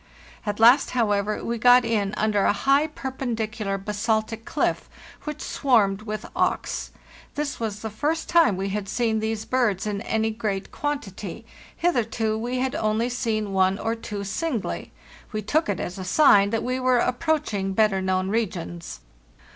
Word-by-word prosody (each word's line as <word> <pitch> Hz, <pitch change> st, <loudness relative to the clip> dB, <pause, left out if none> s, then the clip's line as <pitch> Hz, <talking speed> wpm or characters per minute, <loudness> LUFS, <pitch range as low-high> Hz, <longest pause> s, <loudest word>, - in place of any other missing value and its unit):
At 205 Hz, 0 st, -2 dB
last, 240 Hz, +5 st, +6 dB
however, 210 Hz, -2 st, +1 dB
we 235 Hz, 0 st, -2 dB
got 245 Hz, +1 st, +6 dB
in 210 Hz, -3 st, 0 dB
under 210 Hz, -2 st, +2 dB
a -, -, +4 dB
high, 275 Hz, +8 st, +3 dB
perpendicular 230 Hz, -8 st, -3 dB
basaltic 220 Hz, +2 st, -2 dB
cliff,* -, -, -1 dB, 0.4 s
which 300 Hz, -1 st, -5 dB
swarmed 215 Hz, -7 st, +2 dB
with 215 Hz, 0 st, -5 dB
auks. -, -, -1 dB, 0.5 s
'This 290 Hz, -1 st, -3 dB
was 215 Hz, -2 st, -3 dB
the 220 Hz, -, -2 dB
first 305 Hz, +9 st, -1 dB
time 330 Hz, -, +4 dB
we 195 Hz, +1 st, -2 dB
had 200 Hz, 0 st, -3 dB
seen 225 Hz, -3 st, +1 dB
these 220 Hz, 0 st, -2 dB
birds 235 Hz, -7 st, +1 dB
in 205 Hz, -1 st, -2 dB
any 220 Hz, -1 st, 0 dB
great 215 Hz, -3 st, -3 dB
quantity; 215 Hz, -, -4 dB, 0.3 s
hitherto 225 Hz, -9 st, 0 dB
we 240 Hz, +3 st, -2 dB
had 260 Hz, 0 st, -1 dB
only 215 Hz, +2 st, 0 dB
seen 220 Hz, -5 st, -2 dB
one 190 Hz, 0 st, +3 dB
or 225 Hz, +2 st, -1 dB
two 210 Hz, -3 st, -5 dB
singly. 240 Hz, -, -3 dB, 0.4 s
We 215 Hz, -1 st, -3 dB
took 305 Hz, +6 st, +1 dB
it 200 Hz, -, -1 dB
as 180 Hz, +2 st, -5 dB
a -, -, -4 dB
sign 200 Hz, -1 st, +5 dB
that 225 Hz, +1 st, -1 dB
we 255 Hz, +1 st, -1 dB
were 255 Hz, -1 st, +3 dB
approaching 245 Hz, -7 st, 0 dB
better 210 Hz, -2 st, +2 dB
known 185 Hz, 0 st, 0 dB
regions. 175 Hz, -, -3 dB
220 Hz, 160 wpm, -24 LUFS, 200-245 Hz, 0.5 s, last